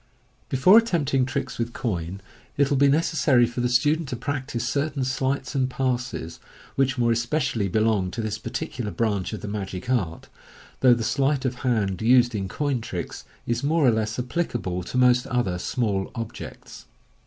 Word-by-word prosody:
Before 180 - +7
attempting 145 - +1
tricks 130 - -4
with 120 0 -2
coin, 95 -5 -3 0.4
it 140 0 +2
will 140 - +3
be 140 +1 +5
necessary 145 -4 +3
for 120 +1 -4
the 125 - +1
stu« 145 +5 +3
dent 160 -4 -6
to - - -3
practise 130 -1 -3
certain 140 +1 -1
sleights 130 +1 -1
and 130 -2 +1
passes 125 -10 -2 0.3
which 135 0 +1
more 120 -1 +2
especially 120 -2 0
belong 110 -1 +1
to 95 +6 -4
this 110 -1 -3
particular 120 -4 -4
branch 100 0 -1
of 110 - -5
the - - -6
magic 100 +1 -4
art, 95 -10 -1 0.5
though 125 -2 +6
the 115 - -3
sleight 135 +3 +1
of 125 -1 -1
hand 110 -7 0
used 120 +1 +5
in 100 -3 -2
"coin 140 +4 -1
tricks" 90 -6 -6 0.2
is 120 - -1
more 155 +1 +2
or 125 - +6
less 110 0 -1
applicable 120 - -2
to 125 - -4
most 125 -1 +4
other 100 -8 0
small 100 -1 -1
objects. 115 -2 -8
125 Hz, 175 wpm, -25 LUFS, 110-135 Hz, 0.5 s, Before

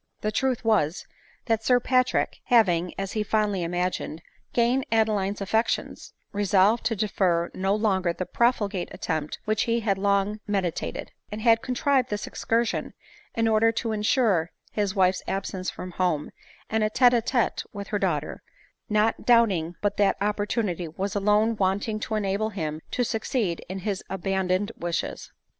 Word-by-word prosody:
• - - -41
The 215 - -1
truth 255 +1 0
was, 200 -6 +1 0.4
that 225 -2 0
Sir 250 +1 +4
Patrick, 255 0 +1
having, 180 -7 +3
as 195 0 -3
he 215 - -1
fondly 210 -2 0
imagined, 175 -1 -2 0.3
gained 245 +3 +2
Adeline's 210 -3 +1
affections, 220 +4 -1 0.2
resolved 205 +2 +3
to 225 0 +1
defer 185 -4 +1
no 195 +2 0
longer 190 -5 +1
die 185 +2 -4
profligate 205 -6 0
attempt 155 -2 -3
which 215 0 +1
he 230 0 +2
had 200 -3 0
long 200 +1 +1
medi 195 -4 0
tated; - - -5 0.2
and 215 +1 -5
had 230 -1 +5
contrived 260 0 +1
this 210 0 -3
excursion 230 0 -1 0.4
in 225 0 +2
order 225 +1 +4
to 230 0 -2
insure 210 - +2 0.2
his 205 -2 -1
wife's 185 -1 +3
absence 190 -1 -3
from 180 - -7
home, 175 -5 -1 0.4
and 220 0 0
a 215 - +2
tete 245 +2 +5
a 235 - +3
tete 240 +1 0
with 200 -1 -7
her 205 - -1
daughter 155 -7 -1 0.3
— - - -44
not 220 +2 +1
doubting 195 -9 +3
but 205 -1 0
that 200 -1 +3
opportunity 205 -3 -1
was 190 +5 -4
alone 210 +3 +3
wanting 205 +3 0
to 220 - -3
enable 205 +1 0
him 160 -6 -4
to 250 - 0
succeed 220 -5 -1
in 190 - -4
his 195 0 -3
abandoned 190 +1 -1
wishes. 170 -1 -4
205 Hz, 160 wpm, -26 LUFS, 185-225 Hz, 0.4 s, had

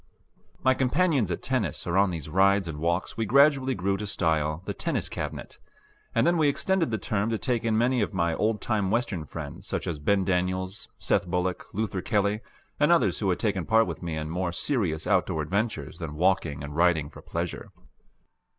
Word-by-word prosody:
My 130 - +5
companions 135 - +2
at 85 - -3
tennis - - -1
or 85 - -1
on 100 0 +4
these 80 -5 -5
rides 95 +3 +3
and 75 -2 -5
walks 85 +6 -1
we 110 -1 -1
gradually 135 +1 +4
grew 95 +1 0
to 105 - -4
style 80 -4 0
the - - -3
Tennis - - -1
Cabinet; - - -6 0.6
and 115 +1 +3
then 175 0 +3
we 155 - +4
extended 180 +3 +1
the 110 - -1
term 100 +4 -1
to 115 - 0
take 120 -1 -1
in 110 -1 +1
many 120 +1 +2
of 105 - 0
my 85 -4 0
old 105 +4 0
time 105 -4 0
Western 105 -8 -1
friends 80 +5 -8
such - - -3
as 85 -5 -3
Ben 95 +5 +2
Daniels, 95 +2 -1
Seth 95 -2 +1
Bullock, 90 0 -1
Luther 100 -2 -2
Kelly, 105 +1 0 0.4
and - - +4
others - - +3
who - - 0
had 90 - +1
taken 100 -5 0
part 115 +2 +4
with - - -6
me 85 -3 -3
in 80 0 -4
more 90 0 -1
serious 85 - -1
outdoor 90 -5 +1
adventures 100 - -2
than 75 -3 -5
walking 85 -4 +1
and 70 0 -7
riding 80 -3 +2
for - - -12
pleasure. 85 0 -4
95 Hz, 195 wpm, -27 LUFS, 85-110 Hz, 0.6 s, My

